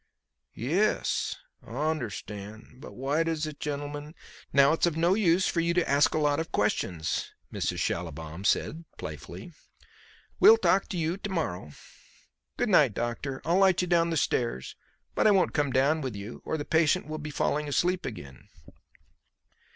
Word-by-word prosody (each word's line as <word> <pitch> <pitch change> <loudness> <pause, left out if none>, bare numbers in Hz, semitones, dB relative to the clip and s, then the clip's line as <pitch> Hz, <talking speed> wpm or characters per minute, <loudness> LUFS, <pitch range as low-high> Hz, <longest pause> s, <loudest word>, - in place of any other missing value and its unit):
"Yes, 175 - 0 0.3
I 115 - -11 0.2
un'stan'. 110 -4 -7
But 145 - -11
why 140 +5 0
does 165 -2 -1
this 155 -1 -3
gennlem'n 145 +1 -5 0.2
?" - - -21
"Now 140 +1 +5
it's 165 - +2
of 165 -2 -2
no 170 +3 +3
use 185 -3 +3
for 170 - 0
you 170 +1 +1
to 175 - +2
ask 140 +3 +3
a - - +2
lot 145 -1 +2
of 160 - -4
questions," 90 -5 -1 0.2
Mrs. - - -2
Schallibaum 80 +1 -4
said 160 +10 0
playfully; - - -8 0.9
"we'll 440 +4 +8
talk 195 - +2
to 185 - -3
you 165 +2 -1
to 205 - -6
morrow. 90 - -3 0.8
Good - - 0
night, - - +4
doctor. 120 +3 -3
I'll 170 +3 +3
light 190 -2 +4
you - - -2
down 170 -1 +3
the 165 - -1
stairs, 120 - -1 0.4
but - - +3
I - - +7
won't 195 -3 +3
come 145 -2 +1
down 140 +5 +2
with 130 -6 -4
you, 100 +3 -8
or 160 - -2
the 145 - -5
patient 160 +2 +2
will 155 +1 -5
be 150 0 -6
falling 150 0 -1
asleep 180 +5 +1
again." 70 - -9
150 Hz, 170 wpm, -28 LUFS, 125-170 Hz, 0.9 s, we'll